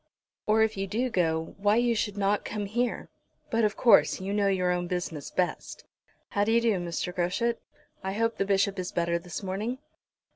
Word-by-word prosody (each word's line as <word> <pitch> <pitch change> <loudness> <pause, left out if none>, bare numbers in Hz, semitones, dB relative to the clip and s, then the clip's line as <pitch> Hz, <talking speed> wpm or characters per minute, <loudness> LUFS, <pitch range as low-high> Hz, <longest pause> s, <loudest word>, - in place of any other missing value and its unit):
"Or, 220 +1 +4
if 220 -2 0
you 195 0 -2
do 235 +6 -1
go, 165 -4 0
why 205 +1 +3
you 240 0 +3
should 210 -2 -2
not 205 +1 +1
come 205 -1 -4
here. 240 +4 -2 0.4
But, 230 0 +2
of 210 -1 +1
course, 240 - +5
you 195 +2 -3
know 205 -1 +2
your 185 -2 +2
own 175 0 -1
business 175 -5 -4
best. 180 -1 -3 0.4
How 205 - +1
d'ye 225 +2 +3
do, 230 -1 +2
Mr. 175 +1 -3
Groschut? 185 +7 0 0.4
I 190 0 -2
hope 230 +2 0
the - - +1
Bishop 200 0 +1
is 180 - -3
better 170 0 0
this 175 +3 -7
morning." 205 +6 -3
200 Hz, 190 wpm, -28 LUFS, 180-220 Hz, 0.4 s, course